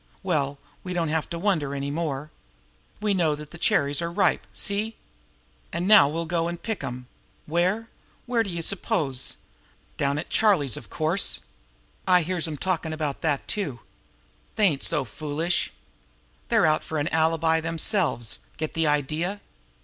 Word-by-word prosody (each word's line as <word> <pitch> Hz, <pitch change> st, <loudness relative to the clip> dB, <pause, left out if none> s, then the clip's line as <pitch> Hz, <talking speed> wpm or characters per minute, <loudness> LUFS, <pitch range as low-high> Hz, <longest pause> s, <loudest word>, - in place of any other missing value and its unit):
Well, 145 Hz, -6 st, 0 dB, 0.3 s
we 180 Hz, -, -4 dB
don't 170 Hz, -3 st, 0 dB
have 160 Hz, -1 st, 0 dB
to 170 Hz, -, -4 dB
wonder 165 Hz, -7 st, 0 dB
any 140 Hz, 0 st, -2 dB
more. 150 Hz, -2 st, -3 dB, 0.7 s
We 210 Hz, -1 st, +1 dB
know 170 Hz, -5 st, +2 dB
now -, -, -2 dB
that 150 Hz, 0 st, -10 dB
the 170 Hz, -, -10 dB
cherries 145 Hz, -3 st, +2 dB
are 170 Hz, -, -1 dB
ripe. 195 Hz, +3 st, +2 dB
See? 210 Hz, +2 st, -1 dB, 0.8 s
An' 175 Hz, -, -2 dB
now 200 Hz, -8 st, +8 dB
we'll 165 Hz, +2 st, -2 dB
go 170 Hz, 0 st, 0 dB
an' 175 Hz, -, -4 dB
pick 215 Hz, -2 st, -4 dB
'em! 125 Hz, -1 st, -5 dB, 0.4 s
Where? 185 Hz, +8 st, +1 dB, 0.4 s
Where 240 Hz, -2 st, +2 dB
d'ye 180 Hz, -6 st, -2 dB
suppose? 165 Hz, -, 0 dB, 0.6 s
Down 140 Hz, 0 st, +1 dB
to 150 Hz, -, -2 dB
Charlie's, 170 Hz, -, +3 dB
of 110 Hz, -, -9 dB
course! 160 Hz, +5 st, 0 dB, 0.7 s
I 180 Hz, -2 st, +5 dB
hears 170 Hz, 0 st, +1 dB
'em 155 Hz, -2 st, -4 dB
talkin' 165 Hz, -2 st, -1 dB
about 150 Hz, -3 st, -2 dB
that, 145 Hz, -4 st, 0 dB
too. 145 Hz, -, -1 dB, 0.7 s
They 215 Hz, -, +4 dB
ain't 140 Hz, -4 st, -3 dB
so -, -, +2 dB
foolish! 155 Hz, +8 st, -1 dB, 0.8 s
They're -, -, +4 dB
out 155 Hz, 0 st, +3 dB
for 160 Hz, -, -4 dB
an 145 Hz, +1 st, 0 dB
alibi 160 Hz, 0 st, +2 dB
themselves. 165 Hz, -, 0 dB, 0.2 s
Get 155 Hz, -1 st, -3 dB
the 165 Hz, -1 st, +1 dB
idea? 155 Hz, +7 st, 0 dB
160 Hz, 160 wpm, -26 LUFS, 145-180 Hz, 0.8 s, now